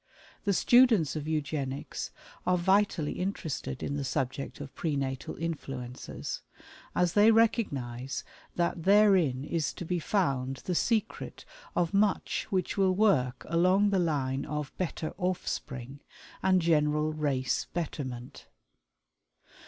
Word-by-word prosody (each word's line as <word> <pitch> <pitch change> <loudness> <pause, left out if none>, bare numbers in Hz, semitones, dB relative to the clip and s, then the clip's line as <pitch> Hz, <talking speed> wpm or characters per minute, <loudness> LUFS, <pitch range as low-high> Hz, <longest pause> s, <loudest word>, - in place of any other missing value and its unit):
The 200 - +3
students 230 - +5
of 155 -1 -4
Eugenics 145 -3 -3 0.4
are 180 0 +4
vitally 190 -4 +2
interested 180 -8 -3
in 145 - -2
the 140 - -2
subject 135 +1 -3
of 140 -1 -8
Pre 155 -4 -2
Natal 135 -2 -3
Influences, 135 -6 -5 0.5
as 175 -1 +2
they 210 +1 +6
recognize 135 - +1 0.3
that 175 0 0
therein 190 -9 +4
is 160 0 -1
to 175 - -7
be 175 +1 -1
found 135 -8 0
the 180 - -1
secret 220 +4 -1 0.3
of 175 0 +1
much 200 0 +1
which 185 -1 -1
will 190 -1 +4
work 130 -12 +2
along 185 +5 +3
the 195 - +3
line 140 -5 0
of 150 -2 -4
"better 165 -3 -3
offspring," 140 -7 -3 0.4
and 185 -2 +3
general 150 -1 +2
race 135 -4 0
betterment. 130 -7 -5
160 Hz, 120 wpm, -29 LUFS, 135-185 Hz, 0.5 s, they